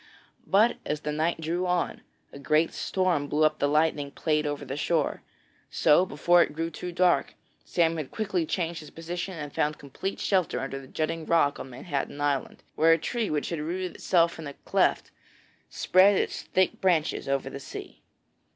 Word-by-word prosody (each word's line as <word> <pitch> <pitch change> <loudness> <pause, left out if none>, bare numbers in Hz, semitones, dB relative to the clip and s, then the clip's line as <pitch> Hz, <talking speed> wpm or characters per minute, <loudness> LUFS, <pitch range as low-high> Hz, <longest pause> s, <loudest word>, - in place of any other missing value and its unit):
But 215 +5 +4
as 150 0 -3
the 150 - -3
night 160 +3 0
drew 170 +3 -1
on, 180 -1 -1 0.3
a 140 - -9
great 155 +3 +2
storm 180 -6 0
blew 150 +2 +1
up 155 - +5
and 155 - -28
the 145 - +2
lightning 150 -1 +1
played 150 +1 0
over 145 -1 -4
the 135 +1 -5
shore. 155 0 0 0.5
So 175 +5 +4
before 175 +4 +4
it 150 - +1
grew 165 +2 -3
too 180 +3 -6
dark, 175 0 +2 0.3
Sam 165 -2 +1
quickly 190 -5 -2
changed 170 -1 -2
his 150 - -11
position 175 +3 -5
and 145 -2 -6
found 150 0 0
complete 145 +8 -5
shelter 185 -9 +1
under 135 +1 -4
a 135 - -13
jutting 160 +3 -3
rock 160 -4 +3
on 135 - -7
Manhattan 140 +2 -4
Island, 145 -2 -1
where 165 +1 +5
a - - +3
tree 225 +6 -2
which 150 -1 -1
had 170 - -3
rooted 180 +4 -3
itself 170 -2 +2
in 160 - -6
a 140 - -8
cleft - - +1 0.6
spread 190 +2 +4
its - - -1
thick 185 -1 0
branches 170 -7 +1
over 135 -1 -1
the 140 - -6
sea. - - -9
160 Hz, 185 wpm, -27 LUFS, 145-175 Hz, 0.6 s, up